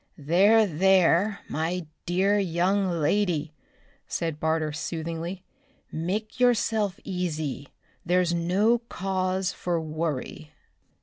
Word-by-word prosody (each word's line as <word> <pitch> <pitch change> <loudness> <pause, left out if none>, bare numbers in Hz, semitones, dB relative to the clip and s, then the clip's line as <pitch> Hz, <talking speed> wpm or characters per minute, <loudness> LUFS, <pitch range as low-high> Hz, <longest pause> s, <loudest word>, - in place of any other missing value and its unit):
"There, 195 +9 +4
there, 190 +2 +3
my 165 +3 -2 0.2
dear 195 +4 +2
young 190 +2 +1
lady," 165 -2 0 0.5
said 165 -3 -3
Barter 160 -1 0
soothingly. 165 +4 -4 0.5
"Make 200 +9 -3
yourself 220 -5 +2
easy. 155 -7 -3 0.3
There's 180 0 +2
no 190 +8 +2
cause 190 -4 -2
for 175 -2 -2
worry." 155 - -4
180 Hz, 95 wpm, -26 LUFS, 160-195 Hz, 0.5 s, There